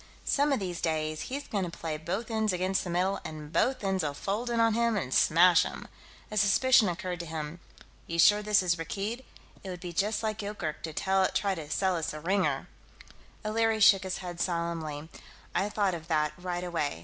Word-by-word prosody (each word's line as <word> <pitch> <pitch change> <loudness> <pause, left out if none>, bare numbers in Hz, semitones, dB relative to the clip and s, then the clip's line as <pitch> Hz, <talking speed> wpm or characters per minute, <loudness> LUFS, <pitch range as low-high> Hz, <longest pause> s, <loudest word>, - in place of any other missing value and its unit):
Some 285 +1 +2
of 275 - +2
these 180 -3 -4
days 155 -1 -1
he's 280 +2 -4
going 200 -3 -1
to 175 - -3
play 165 -1 -4
both 185 +9 -4
ends 220 -1 +1
against 185 +1 0
the 180 - -5
middle 185 +3 0
and 155 -1 -8
both 255 -3 +1
ends'll 190 -7 0
fold 210 +9 -2
in 235 -1 0
on 230 -1 +4
him 235 -1 +2
and 130 -9 -3
smash 170 +1 +6
him." - - -5 0.4
A 215 - -3
suspicion 215 +2 +5
occurred 175 0 -4
to 170 - -5
him. 155 +1 -5 0.5
"You 170 - -3
sure 205 +5 +6
this 210 -2 +3
is 175 -1 +1
Rakkeed? 205 +9 -4 0.4
It 190 - -7
would 180 -1 -6
be 175 -1 -7
just 210 +6 0
like 215 0 -2
Yoorkerk 200 -7 -4
to 160 - -5
try 190 +2 +1
to 160 -5 -7
sell 185 +4 +1
us 165 -2 -2
a - - -6
ringer." 190 +5 0 0.8
O'Leary 225 +1 +1
shook 200 -2 +7
his 190 -1 -3
head 175 -1 -6
solemnly. 165 -4 -2 0.5
"I 200 - +1
thought 205 -3 +1
of 165 -1 -7
that, 150 -2 +1
right 180 0 -4
away. 165 - -2
185 Hz, 200 wpm, -29 LUFS, 165-210 Hz, 0.8 s, shook